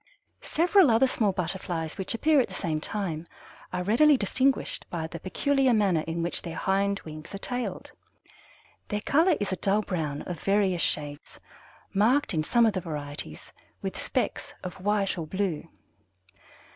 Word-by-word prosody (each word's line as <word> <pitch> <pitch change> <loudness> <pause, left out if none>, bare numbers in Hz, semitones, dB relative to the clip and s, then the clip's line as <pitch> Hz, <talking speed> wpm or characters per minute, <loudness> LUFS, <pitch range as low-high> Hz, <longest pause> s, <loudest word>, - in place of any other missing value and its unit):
Several 355 0 +4
other 230 +3 +5
small 220 -5 +1
Butterflies 175 -3 -3
which 190 +4 -2
appear 295 +3 +4
at - - -1
the - - -9
same 155 -4 -2
time 170 -6 -3 0.4
are 180 0 -2
readily 275 +9 +5
distinguished 260 +5 +1
by 165 -2 -3
the 165 +1 -7
peculiar 265 - +2
manner 190 -7 +2
in 165 +1 -2
which 170 - -1
their 165 -2 -6
hind 200 +1 +1
wings 155 +3 -9
are - - -3
tailed. 245 +4 -4 1.0
Their 210 -1 -2
color 320 - +3
is 205 -2 -2
a 185 - -1
dull 200 +4 +2
brown 155 -7 -3
of 175 -4 -6
various 195 -2 +2
shades, 145 -1 -2 0.5
marked 225 +6 +3
in 155 - +1
some 235 +8 +4
of 220 - +3
the 185 - -2
varieties 145 - -6 0.3
with - - -3
specks - - -2
of 180 0 -7
white 200 -2 +1
or 160 - -4
blue. 185 -3 -2
195 Hz, 160 wpm, -27 LUFS, 165-225 Hz, 1.0 s, other